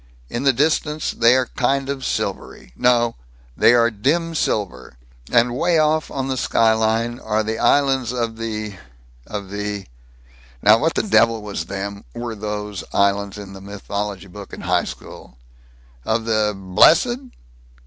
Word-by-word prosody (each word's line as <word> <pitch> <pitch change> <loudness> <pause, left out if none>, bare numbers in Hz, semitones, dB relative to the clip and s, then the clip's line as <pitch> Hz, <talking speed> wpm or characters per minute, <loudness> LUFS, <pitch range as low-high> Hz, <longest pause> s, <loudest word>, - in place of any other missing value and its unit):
In 120 - -3
the 135 0 +4
distance 150 +3 0
they 115 +2 +4
are 130 -1 +2
kind 135 +1 +1
of 140 -1 -4
silvery 60 - -4
no 120 - +2 0.4
they 120 - +5
are 120 0 +4
dim 160 +11 0
silver; 105 - -2 0.3
and 120 +1 +3
way 170 +5 +2
off 155 0 +2
on 135 -1 -3
the 130 -1 -2
skyline 115 +1 +1
are 110 0 -1
the 110 +1 -3
Islands 135 -4 +2
of 115 -2 -3
the 110 -3 -5 0.5
of 100 -2 -6
the 105 -1 -4 0.8
Now 105 +2 +7
what 160 +3 0
the - - +1
devil 115 - +3
was 100 -6 -4
them, 100 +2 -5
were 120 -1 -4
those, 105 -1 -5
islands 100 0 +1
in 100 -1 -9
the 95 - -10
mythology 100 -1 -5
book 100 +1 -11
in - - -7
high - - +1
school? 65 - -10 0.7
Of 110 - -1
the 110 -2 +1
Blessed? 155 - +4
110 Hz, 150 wpm, -21 LUFS, 100-130 Hz, 0.8 s, Now